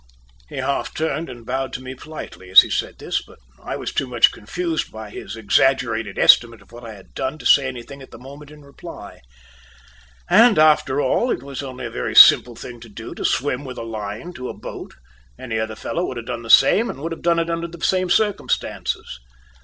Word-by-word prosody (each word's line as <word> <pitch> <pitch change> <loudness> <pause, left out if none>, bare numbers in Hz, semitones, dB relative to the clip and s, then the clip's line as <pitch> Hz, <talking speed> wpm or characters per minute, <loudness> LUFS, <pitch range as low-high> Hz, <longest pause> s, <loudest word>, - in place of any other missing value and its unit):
He - - -10
half - - -2
turned 160 +1 -2
and 120 -2 -11
bowed 130 +1 -3
to - - -4
me 130 0 -7
politely 130 -9 -10
as 95 - +10
he - - -7
said - - -2
this, - - -2
but - - -18 0.2
I - - -5
was - - -5
too 135 - -1
much 120 -2 +4
confused, 165 +9 -4
by 110 -1 -9
his 110 - -8
exaggerated 115 -1 +1
estimate 115 -1 +5
of - - -26
what 120 +1 -12
I 110 -2 -9
had 95 - -17
done 130 +3 -3
to 130 - -13
say 135 +2 +5
anything 130 +2 -8
at 135 - -13
the - - -12
moment 140 +4 -12
in 150 -1 -15
reply. 140 0 -12 1.1
And, 230 -2 +5
after 150 -3 +4
all, 240 - +1
it 125 - -2
was 140 -1 -6
only 130 -2 -7
a - - -6
very 60 - -4
simple 120 -1 +8
thing 120 +1 -10
to 115 0 -13
do, 115 +2 -9
to - - -7
swim 140 0 0
with 130 -2 -8
a - - -5
line 110 - -6
to 130 -5 -7
a - - -8
boat; - - -9 0.4
any 115 -3 -4
other 110 0 -3
fellow 170 +10 -3
could 130 - -6
have 115 - -7
done 115 - -5
the 115 - -11
same, 210 - +5
and - - -7
would 165 +2 -4
have 165 - -6
done 170 -1 +2
it 165 0 -1
under 165 0 -3
the 170 -1 -6
same 185 -1 +1
circumstances. 205 - -1
130 Hz, 220 wpm, -21 LUFS, 115-155 Hz, 1.1 s, as